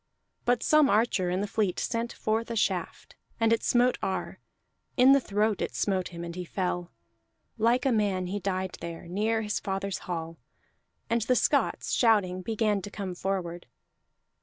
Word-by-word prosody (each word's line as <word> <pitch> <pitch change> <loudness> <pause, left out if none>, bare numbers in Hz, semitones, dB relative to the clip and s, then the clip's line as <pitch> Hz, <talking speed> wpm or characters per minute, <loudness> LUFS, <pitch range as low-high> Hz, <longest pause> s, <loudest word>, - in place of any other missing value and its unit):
But 245 0 +2
some 305 -2 +5
archer 210 -4 +2
in 180 +2 0
the 205 - -1
fleet 200 -3 0
sent 235 0 -2
forth 220 +2 -1
a 230 - -3
shaft, 215 - -2 0.2
and 225 0 +4
it 230 - +1
smote 245 +1 +2
Ar; 190 - -3 0.6
in 255 +1 +7
the 275 - +7
throat 210 -3 0
it - - -3
smote 190 -3 0
him, 170 -1 -8
and 170 0 -6
he 180 - -4
fell. 180 -1 -3 0.7
Like 240 +3 +3
a 270 - +3
man 200 -5 +1
he 195 +3 -3
died 185 -1 -2
there, 170 0 -7
near 220 +5 0
his 210 0 -1
father's 195 0 -3
hall; 165 -1 -4 0.7
and 235 0 +1
the 250 +4 +2
Scots, - - +1
shouting, 200 -6 +3
began 215 0 0
to 205 - -7
come 195 -3 -5
forward. 175 -2 -3
205 Hz, 170 wpm, -28 LUFS, 185-230 Hz, 0.7 s, in